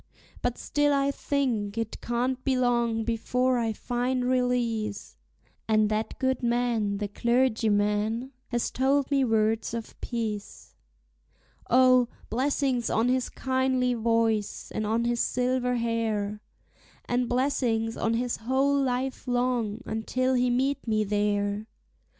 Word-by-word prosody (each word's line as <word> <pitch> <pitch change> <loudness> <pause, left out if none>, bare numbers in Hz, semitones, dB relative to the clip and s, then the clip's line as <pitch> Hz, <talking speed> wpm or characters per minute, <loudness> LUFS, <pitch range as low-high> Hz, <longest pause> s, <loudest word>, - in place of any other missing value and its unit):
But 245 -1 -1
still 290 0 +1
I 275 0 +2
think 240 -8 -1
it 225 -1 -3
can't 250 +2 -1
be 265 -2 +1
long 235 -2 +1
before 250 +2 0
I 225 -1 0
find 245 +3 -1
release; 245 -4 -1 0.5
And 215 -1 +3
that 215 +1 -2
good 260 0 0
man, 235 -4 0
the 205 0 -2
clergyman, 220 0 +1 0.2
has 240 -1 -1
told 275 +2 +1
me 275 -1 +3
words 225 -1 +1
of 230 -1 -7
peace. 220 -4 -5 1.0
O, 255 0 +5 0.2
blessings 260 0 0
on 230 +3 +2
his 255 0 +1
kindly 260 -1 0
voice, 225 -2 0
and 215 - -2
on 230 +2 +1
his 240 0 0
silver 250 0 +1
hair, 220 -3 -1 0.6
And 245 0 0
blessings 240 -3 0
on 225 0 0
his 245 +1 -1
whole 270 +4 +1
life 260 0 -2
long, 245 -3 0
until 255 +4 -1
he 250 0 +2
meet 265 +2 0
me 215 -1 +2
there! 205 0 0
240 Hz, 125 wpm, -27 LUFS, 220-255 Hz, 1.0 s, O